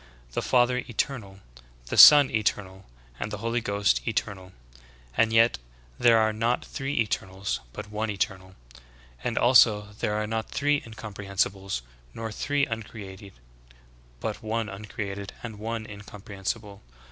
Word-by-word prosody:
The - - -2
Father 125 0 +3
eternal, 110 -5 -4 0.4
the - - -4
Son 145 -3 +10
eternal, 95 -3 -2 0.3
and - - -3
the 105 - -5
Holy 115 +3 -1
Ghost 100 - +1
eternal. 95 -1 -3 0.6
And 110 -1 +3
yet 115 - +4 0.4
there 115 -1 +6
are 110 -1 +2
not 115 +3 0
three 135 +1 -4
eternals; 95 -3 -2
but 105 - -8
one 110 +1 -2
eternal. 95 -2 -3 0.7
As 120 - -2
also 110 -4 +5
there 105 - -1
are 105 0 -1
not 110 +1 -3
three 145 +1 +1
incomprehensibles, 100 - -3 0.3
nor 115 -1 -5
three 145 +5 0
uncreated; 105 -4 -8 0.9
but - - -4
one 110 0 -2
uncreated, 100 -1 -6
and 110 -4 -7
one 110 +1 -4
incomprehensible. 100 0 -7
105 Hz, 130 wpm, -26 LUFS, 100-115 Hz, 0.9 s, Son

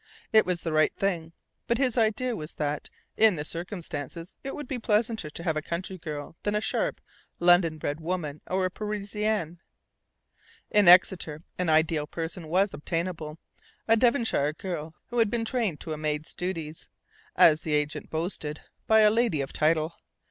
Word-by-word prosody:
It 220 -3 +6
was 180 -2 -1
"the 165 - -2
right 155 0 +3
thing"; 170 -5 -1 0.4
but 235 - +2
his 255 -3 +1
idea 230 +1 +1
was 155 -3 -7
that, 150 -1 -2 0.3
in 220 -3 +6
the 150 -1 -4
circumstances, 170 -2 -6
it 270 - -4
would 295 - -6
be 255 -1 -3
pleasanter 220 -5 0
to 170 - -8
have 160 -3 0
a 155 - -1
country 180 +4 -5
girl 150 -1 -6
than 205 0 -1
a - - +3
sharp, - - -1 0.4
London 175 -2 +4
bred 145 0 -3
woman 160 -3 -3
or 185 0 0
a 185 - -1
Parisienne. 210 -4 -2 1.1
In 210 -3 +4
Exeter 170 -3 +5 0.2
an 180 -2 +1
ideal 155 -1 +2
person 165 +1 -5
was 190 +4 +2
obtainable: 165 +1 -3 0.5
a 225 - +6
Devonshire 230 - +2
girl 160 -2 -5
who 240 0 -1
had 225 -2 +4
been 230 +1 -1
trained 225 - -1
to 160 - -4
a - - -5
maid's 155 0 -2
duties 165 -4 -5 0.5
(as 155 -1 +6
the 155 -2 0
agent 150 0 -2
boasted) 160 -2 -3 0.3
by 220 0 +6
a 210 -1 +6
"lady 225 -8 +2
of 135 -1 -3
title." 155 +1 +2
175 Hz, 170 wpm, -27 LUFS, 155-210 Hz, 1.1 s, It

